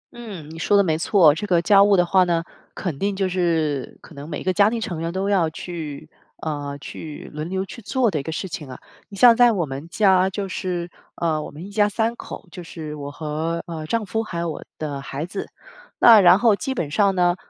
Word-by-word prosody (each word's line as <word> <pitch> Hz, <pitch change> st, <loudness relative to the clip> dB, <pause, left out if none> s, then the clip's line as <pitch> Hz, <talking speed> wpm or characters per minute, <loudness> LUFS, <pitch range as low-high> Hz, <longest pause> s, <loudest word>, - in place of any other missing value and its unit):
嗯， 205 Hz, -10 st, -8 dB
你 165 Hz, -, -9 dB
说 205 Hz, +5 st, +3 dB
的 200 Hz, -, +5 dB
没 160 Hz, -4 st, +1 dB
错， 165 Hz, -2 st, +5 dB
这 205 Hz, +7 st, -5 dB
个 175 Hz, -3 st, +3 dB
家 200 Hz, +2 st, +5 dB
务 200 Hz, -1 st, +4 dB
的 175 Hz, -, +4 dB
话 185 Hz, +2 st, +4 dB
呢， 170 Hz, -2 st, 0 dB, 0.3 s
肯 160 Hz, -7 st, -4 dB
定 200 Hz, 0 st, -1 dB
就 190 Hz, -1 st, 0 dB
是 165 Hz, -7 st, -1 dB
可 165 Hz, -, -16 dB
能 145 Hz, +2 st, -9 dB
每 150 Hz, -, -5 dB
个 185 Hz, -, +1 dB
家 200 Hz, +2 st, +4 dB
庭 230 Hz, 0 st, -2 dB
成 175 Hz, -7 st, -4 dB
员 165 Hz, +1 st, -2 dB
都 190 Hz, +2 st, -2 dB
要 185 Hz, -5 st, +2 dB
去 160 Hz, -2 st, -7 dB, 0.3 s
呃， 145 Hz, -2 st, -4 dB
去 150 Hz, +2 st, -9 dB
轮 155 Hz, +2 st, -5 dB
流 190 Hz, +1 st, -2 dB
去 235 Hz, -, -10 dB
做 240 Hz, 0 st, +1 dB
的 155 Hz, -, -1 dB
一 -, -, -5 dB
个 160 Hz, -, -5 dB
事 175 Hz, +4 st, -4 dB
情 155 Hz, -5 st, -7 dB
啊。 130 Hz, -, -9 dB, 0.3 s
你 200 Hz, -, -10 dB
像 235 Hz, +2 st, +7 dB
在 245 Hz, 0 st, +6 dB
我 180 Hz, -5 st, 0 dB
们 140 Hz, +3 st, -7 dB
家 190 Hz, -1 st, +3 dB
就 195 Hz, +1 st, -4 dB
是， 180 Hz, -2 st, -4 dB, 0.2 s
呃， 160 Hz, -2 st, -1 dB
我 -, -, -7 dB
们 155 Hz, +5 st, -10 dB
一 200 Hz, -, -10 dB
家 205 Hz, 0 st, +2 dB
三 225 Hz, +3 st, -1 dB
口， 210 Hz, -, -9 dB
就 180 Hz, -, -8 dB
是 160 Hz, -2 st, -8 dB
我 145 Hz, -1 st, -6 dB
和， 155 Hz, +3 st, -3 dB
呃， 160 Hz, -2 st, -6 dB
丈 225 Hz, +5 st, -1 dB
夫， 220 Hz, +3 st, -2 dB
还 200 Hz, -6 st, -6 dB
有 170 Hz, -1 st, -2 dB
我 150 Hz, -, -8 dB
的 145 Hz, -3 st, -4 dB
孩 140 Hz, +2 st, -5 dB
子。 190 Hz, +3 st, -6 dB, 0.5 s
那 225 Hz, -3 st, +8 dB
然 180 Hz, 0 st, +7 dB
后 225 Hz, -1 st, +4 dB
基 265 Hz, +8 st, -4 dB
本 155 Hz, -, -3 dB
上 200 Hz, +2 st, +2 dB
呢， 175 Hz, -1 st, +3 dB
175 Hz, 255 characters per minute, -22 LUFS, 155-200 Hz, 0.5 s, 那